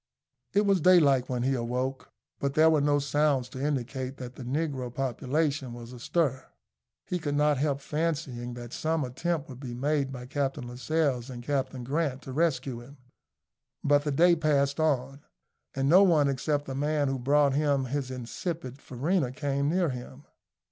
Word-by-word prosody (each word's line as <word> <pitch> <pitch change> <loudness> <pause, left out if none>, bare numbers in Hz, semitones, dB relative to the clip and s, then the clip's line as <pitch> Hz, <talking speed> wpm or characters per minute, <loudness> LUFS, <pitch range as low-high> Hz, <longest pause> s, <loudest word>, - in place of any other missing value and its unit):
It 205 +1 +3
was 195 -3 +3
daylight 145 -8 +5
when 125 -1 -1
he 135 +1 +2
awoke; 125 +2 -2 0.3
but 140 0 -1
there 160 +1 +6
were 155 -2 +3
no 145 0 +3
sounds 145 -2 +1
to 130 - -6
indicate 130 -2 -2
that 125 -1 -7
the 130 - -11
negro 130 -1 -2
population 135 +2 -1
was 120 0 -9
astir. 135 +2 -1 0.6
He 180 - -2
could 145 -3 -2
not 150 -1 +3
help 140 -1 0
fancying 140 -6 -2
that 120 0 -8
some 160 -1 0
attempt 155 +5 -2
would 130 -2 -10
be 125 -3 -6
made 140 +1 0
by 125 -2 -7
Captain 135 -1 -2
Lascelles 130 0 -1
and 120 -2 -7
Captain 130 -2 -2
Grant 140 0 -1
to 135 - -7
rescue 140 -5 0
him; 135 +5 -13 0.9
but 145 0 +4
the 150 - -1
day 170 +5 +5
passed 140 -3 +1
on, 140 -3 0 0.5
and 135 0 0
no 180 +6 +7
one 165 -7 +5
except 145 +2 0
the 135 - -5
man 145 +1 0
who 135 -1 -1
brought 140 +2 +3
him 140 -2 +1
his 135 0 -3
insipid 130 +2 -5
farina 140 +2 -1
came 140 +1 -1
near 175 0 +2
him. 130 +2 -8
140 Hz, 170 wpm, -28 LUFS, 130-150 Hz, 0.9 s, no